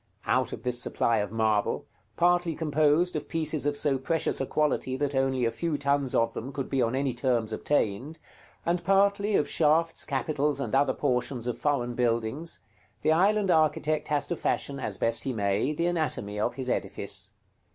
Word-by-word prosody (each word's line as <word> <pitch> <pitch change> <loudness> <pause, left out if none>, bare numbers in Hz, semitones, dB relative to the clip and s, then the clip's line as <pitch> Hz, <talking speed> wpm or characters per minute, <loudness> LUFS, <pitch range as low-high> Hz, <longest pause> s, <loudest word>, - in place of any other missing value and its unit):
Out - - +1
of - - -7
this 125 -1 +1
supply 115 -1 +1
of 105 -1 -2
marble, 110 -2 0 0.3
partly 175 -1 +2
composed 155 +2 +2
of 150 - -3
pieces 155 -2 0
of 145 0 0
so 140 -2 +1
precious 160 +3 -1
a 135 - -2
quality 140 -3 0
that 145 0 -1
only 135 -2 +1
a 115 - +1
few 150 +6 -2
tons 140 -2 0
of 115 0 +2
them 130 +4 -6
could 135 -2 -5
be 135 -2 +1
on 115 +1 +1
any 135 -1 0
terms 120 -3 0
obtained, 135 +4 -1 0.5
and 175 +1 0
partly 200 +2 +3
of 150 - +2
shafts, 165 +1 +2
capitals, 140 +1 -1
and 140 - -4
other 135 0 +3
portions 125 -3 -1
of 125 -2 -2
foreign 125 -5 0
buildings, 120 +6 -1 0.4
the 155 - +2
island 195 +4 +3
architect 155 -1 +2
has 150 -2 0
to 175 - -2
fashion, 140 -3 -2
as - - -3
best 115 0 0
he 135 - -2
may, 100 +4 0
the 170 +3 -1
anatomy 155 -12 -1
of 105 - 0
his 130 -2 -4
edifice. - - -2
140 Hz, 185 wpm, -27 LUFS, 125-155 Hz, 0.5 s, partly